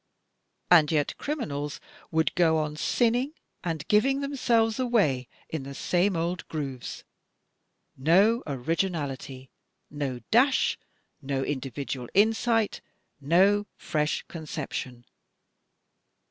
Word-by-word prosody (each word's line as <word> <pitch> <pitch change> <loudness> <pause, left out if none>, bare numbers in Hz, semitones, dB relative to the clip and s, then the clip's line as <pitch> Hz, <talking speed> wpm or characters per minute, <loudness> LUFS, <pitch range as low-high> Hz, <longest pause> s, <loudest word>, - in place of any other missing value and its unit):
And 160 -4 +7
yet 150 -2 +1
criminals 150 - -3 0.3
would 160 0 +1
go 165 -3 +3
on 150 -1 -2
sinning, 245 - +1 0.3
and 160 -3 -3
giving 270 +6 +3
themselves 235 -5 +1
away, 195 - +2 0.2
in 160 - -4
the 135 +1 -8
same 180 +5 +1
old 170 +2 -2
grooves 135 -6 -5 0.5
— - - -50 0.4
no 195 - +4
originality, 140 -3 -3 0.4
no 140 -4 -3
dash, 260 +4 +3 0.4
no 135 -1 -2
individual 135 -2 -4
insight, 225 +1 +2 0.4
no 190 +8 +3
fresh 150 -2 -1
conception 140 -6 -6
160 Hz, 100 wpm, -27 LUFS, 140-215 Hz, 0.5 s, And